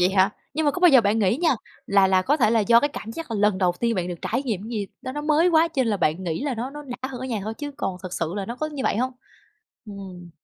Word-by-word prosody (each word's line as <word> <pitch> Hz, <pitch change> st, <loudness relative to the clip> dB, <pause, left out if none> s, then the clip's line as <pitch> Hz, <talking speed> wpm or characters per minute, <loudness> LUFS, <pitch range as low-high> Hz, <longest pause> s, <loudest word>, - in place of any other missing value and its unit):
vậy 180 Hz, +1 st, +4 dB
hả? 190 Hz, +1 st, +4 dB, 0.2 s
Nhưng 315 Hz, 0 st, 0 dB
mà 290 Hz, -, +5 dB
có 360 Hz, -, -5 dB
bao 360 Hz, -, +7 dB
giờ 270 Hz, -6 st, +7 dB
bạn 215 Hz, +1 st, +1 dB
nghĩ 205 Hz, +1 st, +2 dB
nha, 320 Hz, -3 st, +2 dB, 0.3 s
là 195 Hz, -1 st, +4 dB
là 190 Hz, -1 st, +3 dB
có 285 Hz, +10 st, +2 dB
thể 225 Hz, -7 st, +3 dB
là 230 Hz, -1 st, +3 dB
do 230 Hz, +3 st, +5 dB
cái 290 Hz, -, +1 dB
cảm 225 Hz, -5 st, -7 dB
giác 330 Hz, -2 st, -7 dB
là 225 Hz, -, -1 dB
lần 205 Hz, -2 st, +2 dB
đầu 180 Hz, -2 st, +2 dB
tiên 235 Hz, -1 st, +1 dB
bạn 180 Hz, -3 st, -2 dB
được 175 Hz, -2 st, -5 dB
trải 250 Hz, +5 st, -1 dB
nghiệm 215 Hz, -8 st, -2 dB
gì 215 Hz, -4 st, -3 dB, 0.2 s
đó, 260 Hz, -, -5 dB
nó 295 Hz, -, -4 dB
mới 310 Hz, +3 st, +3 dB
quá 330 Hz, 0 st, +4 dB
cho 280 Hz, -5 st, 0 dB
lên 235 Hz, -, -1 dB
là 205 Hz, -, +1 dB
bạn 165 Hz, 0 st, 0 dB
nghĩ 170 Hz, -, -2 dB
là 280 Hz, -4 st, -1 dB
nó 245 Hz, +4 st, -4 dB
nó 295 Hz, +1 st, -8 dB
đã 255 Hz, -1 st, -6 dB
hơn 255 Hz, -2 st, -7 dB
ở 260 Hz, -, -4 dB
nhà 225 Hz, -5 st, -2 dB
thôi, 220 Hz, +1 st, -4 dB
chứ 290 Hz, -1 st, -4 dB
còn 185 Hz, -, -3 dB
thực 185 Hz, -1 st, -7 dB
sự 165 Hz, +2 st, -2 dB
là 200 Hz, -, -2 dB
nó 235 Hz, +1 st, -5 dB
có 310 Hz, -, -2 dB
như 290 Hz, -3 st, -5 dB
vậy -, -, +1 dB
hông? 255 Hz, +3 st, 0 dB, 0.7 s
Ừm. 190 Hz, -4 st, -9 dB
230 Hz, 320 wpm, -24 LUFS, 195-280 Hz, 0.7 s, bao